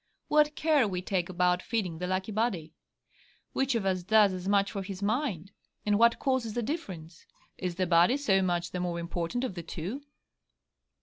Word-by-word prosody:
What 300 0 +4
care 305 -7 +3
we 185 -2 -3
take 185 -2 -1
about 180 0 +2
feeding 185 -9 -2
the 180 - -2
lucky 185 +3 -2
body! 200 -8 -1 0.8
Which 270 -1 +1
of 220 -4 -1
us 185 -1 +1
does 205 +1 +4
as 185 0 -5
much 200 0 +2
for 195 - -3
his 195 0 -6
mind? 205 - -1 0.3
And 205 0 +2
what 235 0 +5
causes 260 -5 -1
the 240 - -1
difference? 185 - -6 0.3
Is 180 -2 -3
the 185 +1 0
body 175 +9 +4
so 195 -9 +2
much 175 -2 -1
the 180 - -3
more 175 -1 -2
important 170 +7 -3
of 255 - -2
the 175 - -5
two? 175 - -5
195 Hz, 185 wpm, -29 LUFS, 180-230 Hz, 0.8 s, what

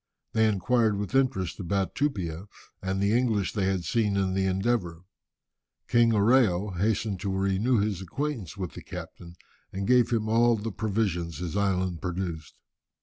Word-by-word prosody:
They 110 0 +4
inquired 110 +1 +2
with 100 +3 -4
interest 125 -11 +1
about 95 +1 -1
Tupia 95 - -2 0.3
and 95 0 -2
the 100 +3 +2
English 110 -6 +1
they 100 -3 0
had 95 -3 -1
seen 105 +1 +1
in 95 -1 +1
the 95 0 +1
Endeavour. 95 -3 -1 0.8
King 120 -1 +4
Oreo 105 -4 +3
hastened 105 +1 0
to 100 - -3
renew 100 +6 +1
his 100 -3 0
acquaintance 110 - -4
with 90 -5 -4
the - - -9
captain, 85 0 -9 0.4
and 95 +1 -3
gave 125 +1 +4
him 110 -2 0
all 115 +2 +4
the 110 +1 -4
provisions 95 -6 -1
his 85 -2 -4
island 95 -4 0
produced. 85 -3 -4
100 Hz, 155 wpm, -27 LUFS, 95-115 Hz, 0.8 s, They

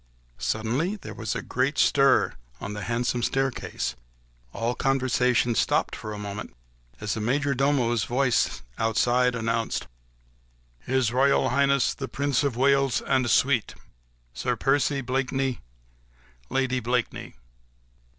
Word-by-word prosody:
Suddenly 110 - -1
there 205 - -9
was 110 -2 -4
a - - -3
great 130 +4 -1
stir 140 -1 +4 0.3
on 100 - -5
the 105 - -5
handsome 120 +2 -1
staircase, 130 - -1 0.6
all 115 - -1
conversation 125 -2 +1
stopped - - +1
for 110 - -7
a 105 - -5
moment 105 0 -6 0.4
as 105 0 -2
the 110 - -3
major 140 +5 +1
domo's 125 -4 +1
voice 120 - +1 0.2
outside 125 +3 +2
announced,— 115 0 -1 0.9
"His 125 - 0
Royal 135 0 +3
Highness 140 0 +2
the - - -5
Prince 140 -1 0
of 135 -5 -1
Wales 135 0 +3
and 130 -3 +1
suite, 125 -3 +2 0.6
Sir - - -1
Percy 140 0 +1
Blakeney, 130 0 -1 0.9
Lady 130 -1 0
Blakeney." 120 0 -2
125 Hz, 120 wpm, -26 LUFS, 115-135 Hz, 0.9 s, stir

